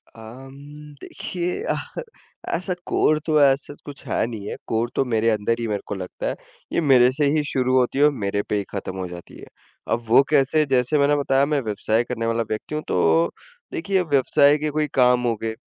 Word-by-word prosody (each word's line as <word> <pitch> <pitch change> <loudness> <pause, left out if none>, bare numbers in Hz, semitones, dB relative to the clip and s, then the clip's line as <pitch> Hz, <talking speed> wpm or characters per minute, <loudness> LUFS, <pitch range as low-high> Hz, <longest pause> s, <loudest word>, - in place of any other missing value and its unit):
अम्म, 135 +6 -12
देखिए 180 - -4 0.9
ऐसा 180 +1 -2
कोर 155 0 +2
तो 155 -2 +2
ऐसा 140 +1 +2
कुछ 145 -1 -10
है - - 0
नहीं 105 -4 -7
है। - - -4
कोर 115 +1 -1
तो - - +2
मेरे 115 -1 +1
अंदर 110 +1 0
ही 115 - -2
मेरे 105 -1 -2
को 100 - -4
लगता 90 -1 -6
है - - -2 0.4
ये - - +1
मेरे 130 -4 +5
से 145 +2 0
ही 150 -1 +1
शुरू 130 -3 0
होती 130 +2 +1
है - - +5
और 150 - +5
मेरे 100 +1 0
पे 105 - 0
ही 100 - -1
खत्म 95 -2 -5
हो 95 -1 -4
जाती 85 0 -11
है। - - -11 0.5
अब 120 +1 0
वो 120 +4 +6
कैसे? 150 +1 +3
जैसे 130 +2 +1
मैंने 145 +1 +3
बताया 140 -1 +2
मैं 145 -2 0
व्यवसाय 110 +1 0
करने 115 -1 -4
वाला 115 0 0
व्यक्ति 110 +7 -4
हूँ। 155 - -3
तो 85 -1 +2 0.4
देखिए 190 +3 0
व्यवसाय 145 -1 +3
के 150 0 -2
कोई 150 0 -1
काम 125 -1 +3
होंगे। 115 -1 -2
130 Hz, 205 wpm, -22 LUFS, 110-145 Hz, 0.9 s, वो